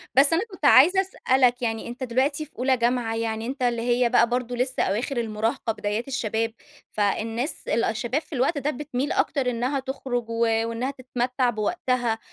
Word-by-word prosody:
بس 280 +4 +6
أنا 330 - +3
كنت 340 -5 -5
عايزة 345 +9 +7
أسألك، 255 -9 +1
يعني 225 -2 -2
أنتَ 245 +2 -6
دلوقتي 275 +5 0
في 305 - -23
أولى 260 0 +2
جامعة، 235 -1 0
يعني 225 0 -2
أنتَ 265 +2 -5
اللي 235 -1 +1
هي 240 0 +2
بقى 240 -1 +4
برضه 245 0 -2
لسه 255 +2 0
أواخر 240 +7 -1
المراهَقة 225 +1 -1
بدايات 215 +4 -3
الشباب، 225 -4 -1 0.4
فالناس 225 +6 -2
ال 230 - +1
الشَّباب 240 +6 -1
في - - -14
الوقت 275 +5 +1
ده 285 +1 -1
بتمِيل 285 0 -3
أكتر 270 -4 +1
إنها 250 +4 -1
تخرُج 255 -3 -4
و - - -4 0.3
وإنها 240 +4 -2
تتمتَّع 250 -1 -1
بوقتها. 240 - -1
245 Hz, 175 wpm, -25 LUFS, 230-270 Hz, 0.4 s, عايزة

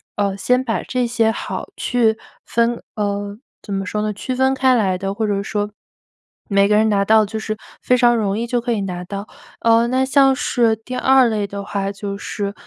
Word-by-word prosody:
呃， 200 -1 -1
先 250 +5 +1
把 225 -4 -2
这 250 -1 -1
些 230 -2 +1
好 - - -5
去 225 -3 +1 0.3
分 235 0 0
呃， 205 -1 -2 0.2
怎 - - -10
么 195 0 -2
说 210 +1 -2
呢？ 215 0 -1
区 255 +5 -4
分 265 +1 +2
开 260 -1 +3
来 190 -5 +1
的 195 +1 -3
或 220 +2 -1
者 200 -1 0
说， 205 0 -2 0.8
每 200 0 +4
个 210 - +3
人 220 +1 +4
拿 200 -1 +2
到 220 0 +5
就 220 +2 -5
是 215 0 -3 0.3
非 250 - +3
常 240 -1 +4
容 205 -1 0
易 235 - -2
就 245 0 0
可 240 +1 -3
以 205 - -1
拿 180 -2 -4
到。 200 +3 -6 0.3
呃， 230 0 +4
那 260 +1 +1
像 270 0 +4
是 230 -3 +1
第 225 +3 -8
2 260 0 +4
类 210 -2 -1
的 200 0 -6
话， 200 0 -3
就 200 0 -5
是 200 -1 -4
220 Hz, 225 characters per minute, -20 LUFS, 200-240 Hz, 0.8 s, 到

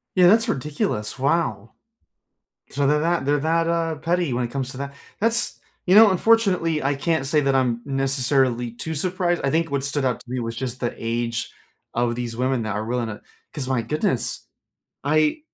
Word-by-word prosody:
Yeah, 180 -2 +6
that's 225 +4 +4
ridiculous. 125 -7 -2
Wow. 125 -7 0 1.0
So, 140 - 0
they're 150 +2 +3
that 165 -3 0
they're 145 +1 +3
that, 165 +2 +1
uh, 165 -1 0
petty 170 0 0
when 120 +1 0
it 120 - -4
comes 130 0 -3
to 130 - -9
that. 140 0 -5 0.3
That's 230 +2 +1 0.3
you 185 +2 +4
know, 220 -1 +9
unfortunately, 185 -6 +2
I 135 +2 +1
can't 155 0 -1
say 150 +2 +3
that 135 -1 +2
I'm 125 -3 +1
necessarily 135 -3 +1
too 160 +7 -5
surprised. 175 +2 0
I 135 - +2
think 165 +2 +1
what 140 -1 -1
stood 140 0 -1
out 125 -2 0
to 120 - -15
me 130 - -2
was 115 -1 -3
just 125 0 -4
the 120 - -2
age 115 0 -2 0.4
of 120 0 0
these 120 -1 -4
women 130 -1 0
that 110 -1 -3
are 105 - -2
willing 120 -1 -1
to 105 -1 -7 0.3
'cause 140 -4 -4
my 130 -3 +1
goodness. 150 +7 -1 0.6
I 155 - +2
140 Hz, 195 wpm, -23 LUFS, 120-165 Hz, 1.0 s, know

